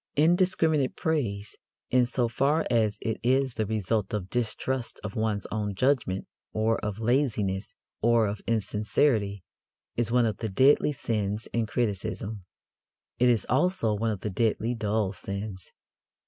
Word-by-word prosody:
Indiscriminate 160 -3 +3
praise, 110 -11 -2 0.3
in 125 -1 +4
so 125 -1 +1
far 140 +7 +1
as 110 -3 +2
it 110 -1 -2
is 130 +1 +2
the 110 -2 -2
result 105 -1 -1
of 95 -2 -4
distrust 120 +1 -2
of 105 -1 -5
one's 110 -2 -1
own 105 -2 -2
judgment 120 -5 +1 0.3
or 110 +1 +1
of 105 -1 -2
laziness 110 -6 0 0.3
or 115 0 +4
of 100 0 -3
insincerity, 105 -1 +1 0.5
is 115 -1 0
one 125 -1 +4
of 110 - -1
the 110 - -3
deadly 135 +9 +4
sins 105 -5 -2
in 115 -1 0
criticism. 105 -2 -2 0.7
It 125 0 +5
is 115 -4 +2
also 135 - +2
one 110 +2 0
of 105 -4 -3
the 105 - -3
deadly 115 +3 +1
dull 110 -3 0
sins. 100 -1 -5
110 Hz, 145 wpm, -27 LUFS, 105-125 Hz, 0.7 s, It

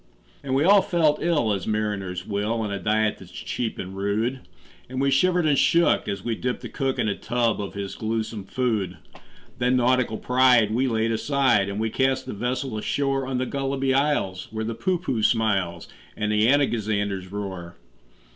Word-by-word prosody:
And 135 -2 -2
we 140 - +3
all 200 +3 +6
felt 160 -5 +1
ill 150 -11 +2
as 95 -3 -4
mariners 100 -4 -2
will, 105 +2 -1
On 105 -2 -2
a 100 - -3
diet 110 +3 +1
that's - - -13
cheap 115 -2 -4
and 95 +1 -6
rude; 105 +6 -1 0.5
And 130 0 -4
we 140 0 +2
shivered 175 +5 +3
and 150 -2 +3
shook 170 0 +3
as 100 -2 -3
we 120 - 0
dipped 125 +3 -3
the - - -7
cook 135 -1 -2
In - - 0
a 100 - +1
tub 115 -2 0
of 100 - -6
his 100 -1 -5
gluesome 110 -2 -3
food. 110 -5 -1 0.6
Then 125 +1 +2
nautical 125 -2 +2
pride 125 -4 +4
we 130 +3 +1
laid 115 -1 0
aside, 120 -4 +2
And 100 +1 -4
we 110 0 -1
cast 130 +1 +1
the - - -5
vessel 125 +1 -2
ashore 135 +3 -1
On 130 -1 -2
the 130 - 0
Gulliby 135 0 -1
Isles, 135 -10 0
where 110 0 -4
the 115 - -2
Poohpooh 170 - -1
smiles, 100 -8 +1 0.3
And 105 0 -1
the 105 +1 +3
Anagazanders 105 -8 0
roar. 95 -4 -6
115 Hz, 185 wpm, -24 LUFS, 105-135 Hz, 0.6 s, all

